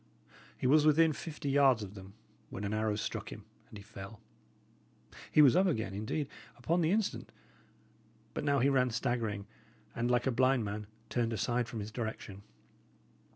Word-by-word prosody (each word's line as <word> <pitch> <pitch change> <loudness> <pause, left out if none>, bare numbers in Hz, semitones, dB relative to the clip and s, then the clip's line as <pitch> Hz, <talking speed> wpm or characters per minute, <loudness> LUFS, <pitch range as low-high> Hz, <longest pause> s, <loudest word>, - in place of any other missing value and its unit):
He - - -5
was 145 +4 +5
within 155 +1 +5
fifty 150 -2 -5
yards 135 -5 +4
of 100 -1 -8
them, 95 0 -12 0.3
when 100 - -6
an 100 +1 -2
arrow 110 -1 0
struck 105 - -4
him - - -9 0.2
and 105 - -10
he 100 - -11
fell. 100 +2 -10 1.1
He 150 - +7
was 140 +1 +6
up 190 +2 +4
again, 110 - -1
indeed, 110 +8 -3 0.3
upon 165 +9 0
the 160 - +2
instant; 210 +2 -1 1.0
but - - -3
now 140 -1 +2
he 135 +1 +3
ran 130 -2 +3
staggering, 110 -4 -2 0.5
and, 120 +1 -1
like 125 0 +2
a 130 - +2
blind 130 -1 +2
man, 105 +1 -5 0.2
turned 115 -2 0
aside 120 +2 0
from 115 -2 -5
his 105 +2 -6
direction. 110 -4 -5
120 Hz, 170 wpm, -32 LUFS, 105-140 Hz, 1.1 s, He